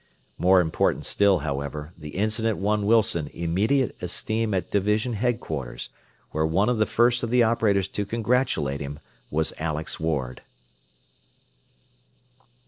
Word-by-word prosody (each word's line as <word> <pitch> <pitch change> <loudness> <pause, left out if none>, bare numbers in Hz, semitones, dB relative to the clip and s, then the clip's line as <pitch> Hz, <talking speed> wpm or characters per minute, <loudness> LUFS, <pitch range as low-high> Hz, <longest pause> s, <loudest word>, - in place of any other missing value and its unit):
More 90 0 +5
important 80 -2 0
still, 100 -5 +3
however, 75 +2 -4
the 75 -3 -10
incident 110 +1 0
won 105 +1 0
Wilson 110 -8 +2
immediate 105 +11 +1
esteem 110 +5 -1
at 95 - -2
division 105 +4 +1
headquarters, 105 - -3 0.4
where 80 - 0
one 90 +8 +2
of 120 -3 0
the 110 - +3
first 120 +1 +3
of 115 - -2
the 125 0 +4
operators 105 -4 +2
to 105 - -2
congratulate 110 - 0
him 70 +1 -5 0.3
was 80 +1 -1
Alex 80 -1 -1
Ward. 70 -6 -2
100 Hz, 130 wpm, -25 LUFS, 80-110 Hz, 0.4 s, More